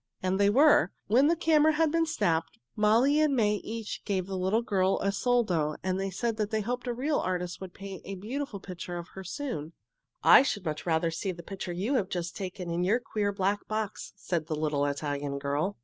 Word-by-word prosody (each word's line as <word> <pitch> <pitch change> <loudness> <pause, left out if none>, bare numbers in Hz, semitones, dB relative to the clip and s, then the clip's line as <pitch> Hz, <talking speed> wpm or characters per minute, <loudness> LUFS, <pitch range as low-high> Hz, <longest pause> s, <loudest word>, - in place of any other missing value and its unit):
And 185 +1 0
they 200 0 +5
were. 275 - +5
When 255 +7 +4
the 335 - +3
camera 315 -1 +4
had 315 0 +2
been 330 0 +2
snapped, 165 - 0 0.2
Molly 230 +8 +4
and 305 -3 +3
May 210 -3 +2
each 220 +1 -6
gave 190 -3 -1
the 190 0 -5
little 190 +5 +1
girl 190 -3 +1
a 200 - +1
soldo 195 -10 +1
and 190 +1 -1
said 230 +3 -2
they 215 0 0
hoped 245 +4 -3
a - - +1
real 285 +5 0
artist 180 -1 -3
would 185 -2 -8
paint 195 -1 -8
a 195 - -6
beautiful 230 +3 -5
picture 180 -1 -6
of 170 0 -7
her 190 - -9
soon. 180 - -5 0.5
"I - - +9
should 205 -8 -2
much 155 +1 -4
rather 165 0 +2
see 185 +4 -2
the 170 -1 -9
picture 190 0 -6
you 195 +10 -1
have 195 -5 -1
just 175 -1 -3
taken 185 -2 -5
in 170 +1 0
your 210 +7 +3
queer, 210 -4 -1
black 200 +1 -1
box," 215 -1 -4
said 170 -5 -3
the 155 - -2
little 150 -2 0
Italian 145 -1 -3
girl. 145 +8 -1
195 Hz, 210 wpm, -29 LUFS, 175-230 Hz, 0.5 s, I